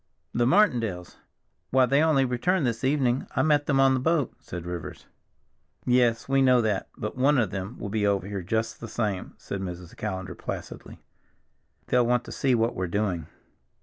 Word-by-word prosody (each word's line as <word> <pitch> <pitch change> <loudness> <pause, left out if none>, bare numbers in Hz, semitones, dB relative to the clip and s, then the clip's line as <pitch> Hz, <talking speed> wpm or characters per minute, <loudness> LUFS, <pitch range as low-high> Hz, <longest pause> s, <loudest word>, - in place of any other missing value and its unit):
"The 120 0 +2
Martindales! 115 - +2 0.5
Why, 130 0 +4
they 140 +4 +3
only 155 -4 +3
returned 140 +7 +1
this 115 -1 -2
evening—I 130 -2 +1
met 150 -2 +2
them 135 -2 +2
on 135 0 +5
the 130 - +1
boat," 155 0 +1
said 85 -1 -8
Rivers. 85 -2 -6 0.8
"Yes, 120 -2 +2
we 135 0 +3
know 130 -2 +5
that, 105 -4 0
but 105 - -4
one 140 +3 +3
of 110 -6 +1
them 95 +4 -5
will 100 - -5
be 105 0 0
over 100 -3 +1
here 100 -1 -4
just 110 +5 -2
the 115 - -7
same," 105 -4 -3
said 100 - -6
Mrs. 90 -2 -7
Callender 95 -3 -4
placidly. - - -8 0.8
"They'll 125 -1 +2
want 125 0 +2
to - - -10
see 130 -2 +1
what 115 +1 +1
we're 95 0 -2
doing. 90 -4 -1
120 Hz, 180 wpm, -26 LUFS, 100-130 Hz, 0.8 s, on